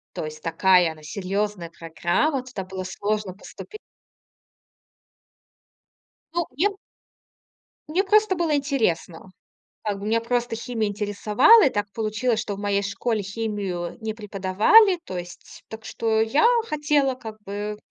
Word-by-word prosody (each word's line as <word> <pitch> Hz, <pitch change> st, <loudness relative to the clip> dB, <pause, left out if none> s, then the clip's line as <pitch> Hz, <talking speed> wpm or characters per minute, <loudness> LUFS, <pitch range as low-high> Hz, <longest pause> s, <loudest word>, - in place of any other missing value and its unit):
То -, -, -3 dB
есть 155 Hz, 0 st, -8 dB
такая 180 Hz, 0 st, +3 dB
она 155 Hz, -1 st, -15 dB
серьёзная 195 Hz, +1 st, -3 dB
программа. 175 Hz, -, -1 dB
Туда 250 Hz, -7 st, -7 dB
было 185 Hz, 0 st, -6 dB
сложно 205 Hz, 0 st, -3 dB
поступи 430 Hz, -, -11 dB, 2.6 s
Ну, 345 Hz, -2 st, 0 dB
мне 380 Hz, +7 st, +3 dB, 1.2 s
мне 365 Hz, +6 st, +1 dB
просто 420 Hz, -1 st, +3 dB
было 330 Hz, -3 st, +1 dB
интересно. 220 Hz, -, -1 dB, 0.5 s
Как 205 Hz, -2 st, -2 dB
бы 200 Hz, -, -7 dB
меня 225 Hz, +1 st, +2 dB
просто 240 Hz, 0 st, -1 dB
химия 225 Hz, -3 st, -2 dB
интересовала. 210 Hz, -, +4 dB
И -, -, +4 dB
так 205 Hz, -2 st, -2 dB
получилось, 220 Hz, +1 st, -1 dB
что 205 Hz, -4 st, -4 dB
в -, -, -10 dB
моей 200 Hz, -1 st, 0 dB
школе 210 Hz, +2 st, -2 dB
химию 200 Hz, -4 st, -4 dB
не 220 Hz, -1 st, -3 dB
преподавали. 215 Hz, -, +4 dB
То 185 Hz, -, -5 dB
есть, 175 Hz, 0 st, -10 dB
так 220 Hz, 0 st, -9 dB
что 220 Hz, -1 st, 0 dB
я 270 Hz, -, +3 dB, 0.2 s
хотела 290 Hz, -3 st, +1 dB
как 220 Hz, -3 st, -9 dB
бы 205 Hz, +1 st, -4 dB
210 Hz, 135 wpm, -24 LUFS, 190-255 Hz, 2.6 s, интересовала